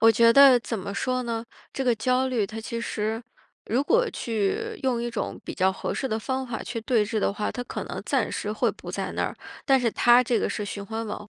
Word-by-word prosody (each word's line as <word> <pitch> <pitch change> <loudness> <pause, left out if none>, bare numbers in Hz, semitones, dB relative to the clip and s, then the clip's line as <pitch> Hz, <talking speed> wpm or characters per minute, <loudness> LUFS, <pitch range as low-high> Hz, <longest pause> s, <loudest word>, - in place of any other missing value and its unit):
我 225 +1 +7
觉 230 +1 +6
得 275 -2 +8
怎 230 -2 -4
么 200 +1 -5
说 255 +3 -1
呢？ 230 -1 -3 0.3
这 270 - -2
个 245 -2 +3
焦 255 +4 +1
虑 225 -6 0
它 220 +3 -7
其 230 +1 -4
实 220 0 -2 0.4
如 245 +5 +1
果 475 +10 +3
去 245 - -2
用 250 -3 0
一 240 - -2
种 235 - -4
比 - - -5
较 190 0 +3
合 - - -4
适 265 - -2
的 220 - -1
方 260 +3 -3
法 235 -2 -4
去 230 -2 -4
对 230 -3 +2
峙 220 +1 -2
的 205 - +1
话， 210 +1 -2
它 245 - -4
可 - - -5
能 - - -6
暂 - - 0
时 - - -3
会 - - +1
不 - - -9
在 - - -3
那 - - -1
儿。 - - -4 0.3
但 270 -3 +5
是 235 -2 +1
它 240 +3 +5
这 235 -1 +1
个 - - 0
是 210 - -3
循 205 0 -5
环 225 +2 -4
往 210 0 -6
235 Hz, 270 characters per minute, -26 LUFS, 215-255 Hz, 0.4 s, 得